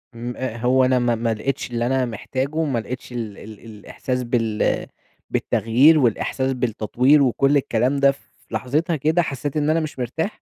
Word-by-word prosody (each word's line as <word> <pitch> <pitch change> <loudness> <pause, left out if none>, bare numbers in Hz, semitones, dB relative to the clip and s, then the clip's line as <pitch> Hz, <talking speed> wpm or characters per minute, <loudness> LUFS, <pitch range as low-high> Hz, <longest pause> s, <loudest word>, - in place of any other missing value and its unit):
إمم، 120 +1 -5
آآ، 130 -3 -4
هو 125 +2 +3
أنا 130 0 +3
ما 120 -1 +1
ما 115 0 -1
لقيتش 125 +4 -3
اللي 120 0 -1
أنا 130 +1 +1
محتاجه، 130 +7 -3
ما 135 -6 -1
لقيتش 125 +3 -7
ال 115 -4 -5
ال 110 -1 -11
الإحساس 115 +4 -5
بال 115 -3 0 0.4
بالتغيير 135 +8 +3
والإحساس 130 +2 0
بالتطوير 125 +4 +2
وكل 135 +3 +3
الكلام 125 0 +1
ده، 140 0 +5
في 140 - -14 0.3
لحظتها 140 +10 -1
كده 155 +4 +2
حسيت 145 -1 -3
إن 150 0 +1
أنا 160 +1 +3
مش 155 -4 -5
مرتاح 160 - -3
130 Hz, 175 wpm, -22 LUFS, 115-140 Hz, 0.4 s, ده